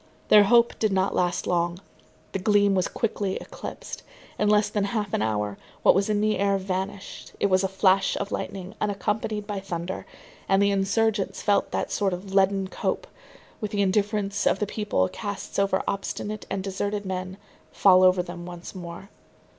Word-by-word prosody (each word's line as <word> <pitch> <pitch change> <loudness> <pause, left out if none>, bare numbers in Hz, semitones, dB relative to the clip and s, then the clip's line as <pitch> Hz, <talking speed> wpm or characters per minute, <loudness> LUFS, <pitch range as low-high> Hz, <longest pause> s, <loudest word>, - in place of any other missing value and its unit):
Their 210 -1 +8
hope 235 +2 +4
did 215 -2 +2
not 190 0 +1
last 180 -1 0
long; 175 0 0 0.5
the 195 - -2
gleam 205 0 +3
was 185 -2 +1
quickly 205 -4 -2
eclipsed. - - -8 0.4
In 210 - +3
less 210 0 +4
than 205 -2 -1
half 205 -1 -2
an - - +1
hour, 105 -2 -1 0.2
what - - +7
was 195 +3 +1
in 210 -1 +1
the 215 -2 +1
air 200 0 +2
vanished, 190 +1 -5
it 200 - +1
was 185 +1 +4
a - - +2
flash 190 0 +2
of 200 - -4
lightning 190 0 -5
unaccompanied 210 +1 -1
by 205 -1 -3
thunder, 175 -1 -5 0.4
and 195 0 +4
the 200 0 +4
insurgents 200 +1 0
felt 205 -1 +2
that - - -2
sort 195 -3 +1
of 190 +2 -6
leaden 195 0 +3
cope, 345 - -2 0.5
which 210 -1 -4
the 200 -1 +2
indifference 200 +1 0
of - - +3
the 210 - -1
people 205 - 0
casts 205 - -5
over 195 -1 +2
obstinate 205 +1 -3
and 195 -1 -2
deserted 200 +1 -2
men, 185 0 -4 0.3
fall 185 -2 +5
over 185 -1 +5
them 175 0 -8
once 175 0 -8
more. 175 +1 -8
195 Hz, 180 wpm, -25 LUFS, 185-205 Hz, 0.5 s, Their